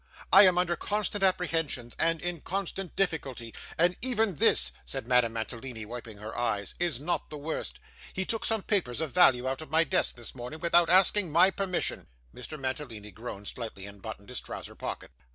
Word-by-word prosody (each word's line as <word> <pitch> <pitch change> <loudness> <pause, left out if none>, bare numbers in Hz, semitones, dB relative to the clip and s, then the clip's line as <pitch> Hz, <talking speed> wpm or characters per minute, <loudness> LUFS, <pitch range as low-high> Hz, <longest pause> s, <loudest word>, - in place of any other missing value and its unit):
I 200 - +10
am 180 -1 +3
under 175 -1 +2
constant 210 0 -1
apprehensions, 165 -10 0
and 165 0 +2
in 175 -3 -3
constant 195 -1 -3
difficulty. 135 -11 -1 0.2
And 175 +2 +3
even 225 - +1
this,' - - +3
said - - -4
Madame 125 -3 +4
Mantalini, 115 0 -5
wiping 115 -1 -8
her 110 +2 -7
eyes, 105 -5 -1
'is 170 -7 0
not 170 +5 -2
the 150 - -6
worst. 150 +2 -4 0.3
He 190 - -2
took 225 +2 -2
some 220 -3 +1
papers 170 - 0
of 160 -3 -2
value 130 -9 +5
out 135 +3 -2
of 155 - -9
my 160 +1 +4
desk 155 - +1
this 120 -2 -7
morning 125 +5 -7
without 170 0 +4
asking 185 0 +4
my 180 +5 +6
permission.' 185 - -1 0.3
Mr. 150 +5 -8
Mantalini 130 -6 -4
groaned 105 0 -7
slightly, 110 -5 -6
and 100 -1 -11
buttoned 100 +3 -8
his 125 - -4
trousers - - -7
pocket. - - -5
150 Hz, 185 wpm, -29 LUFS, 120-180 Hz, 0.3 s, I